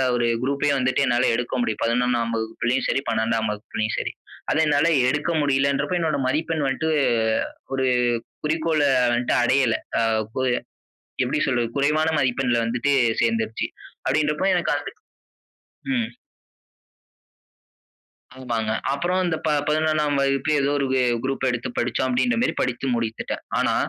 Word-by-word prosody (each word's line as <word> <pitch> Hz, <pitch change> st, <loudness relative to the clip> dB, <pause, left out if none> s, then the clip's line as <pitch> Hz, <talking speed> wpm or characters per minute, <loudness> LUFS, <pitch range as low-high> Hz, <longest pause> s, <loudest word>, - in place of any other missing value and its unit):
ஒரு 120 Hz, -1 st, +1 dB, 0.2 s
குரூப் 140 Hz, +2 st, -1 dB
வந்துட்டு 130 Hz, -1 st, +1 dB
என்னால 120 Hz, -, +2 dB
எடுக்க 125 Hz, 0 st, -3 dB
முடியும். 110 Hz, -2 st, -2 dB
11ம் 120 Hz, 0 st, +1 dB
வகுப்புலயும் 115 Hz, +3 st, -1 dB
சரி, -, -, +1 dB
12ம் 110 Hz, 0 st, 0 dB
வகுப்புலயும் 110 Hz, +1 st, -3 dB
சரி. -, -, -3 dB, 0.4 s
அத -, -, +1 dB
என்னால 150 Hz, +2 st, +3 dB, 0.2 s
எடுக்க 145 Hz, +5 st, 0 dB
முடியலன்றப்ப 140 Hz, +5 st, +1 dB
என்னோட 160 Hz, -3 st, 0 dB
மதிப்பெண் 155 Hz, +3 st, -1 dB
வந்துட்டு 150 Hz, +4 st, 0 dB, 0.5 s
அ, -, -, -6 dB, 0.3 s
ஒரு 130 Hz, 0 st, 0 dB, 0.6 s
குறிக்கோள 155 Hz, 0 st, 0 dB, 0.3 s
வந்துட்டு 120 Hz, +1 st, +1 dB
அடையல. 130 Hz, -2 st, +3 dB, 0.2 s
அ -, -, +2 dB, 0.3 s
கு 130 Hz, -, -1 dB, 0.8 s
எப்படி -, -, 0 dB
சொல்றது? 120 Hz, -3 st, +1 dB
குறைவான 150 Hz, +3 st, +2 dB
மதிப்பெண்ல 125 Hz, -2 st, +1 dB
வந்துட்டு 125 Hz, +5 st, 0 dB, 0.3 s
சேர்ந்துருச்சி. 115 Hz, -1 st, 0 dB, 0.4 s
அப்படின்றப்ப 155 Hz, +6 st, +1 dB
அது -, -, -7 dB, 1.0 s
ம். 235 Hz, -3 st, 0 dB, 2.3 s
ஆமாங்க. 115 Hz, -4 st, -2 dB, 0.2 s
அப்பறம் 180 Hz, +6 st, 0 dB
இந்த 160 Hz, -2 st, 0 dB
ப 155 Hz, -, +2 dB, 0.2 s
11ம் 155 Hz, -1 st, +1 dB
வகுப்பு 135 Hz, +2 st, +1 dB
ஏதோ 140 Hz, -, +1 dB
ஒரு 140 Hz, -, 0 dB
வெ 130 Hz, -, +3 dB, 0.2 s
குரூப் 135 Hz, 0 st, -2 dB
எடுத்து 120 Hz, 0 st, -2 dB
படிச்சோம் 125 Hz, +2 st, 0 dB
அப்டீங்குற 230 Hz, -, +1 dB
மேரி 255 Hz, -, +1 dB
படித்து 125 Hz, +1 st, -2 dB
முடித்திட்டேன். 115 Hz, -1 st, -3 dB, 0.2 s
ஆனா -, -, +2 dB
135 Hz, 130 wpm, -23 LUFS, 120-150 Hz, 2.3 s, என்னால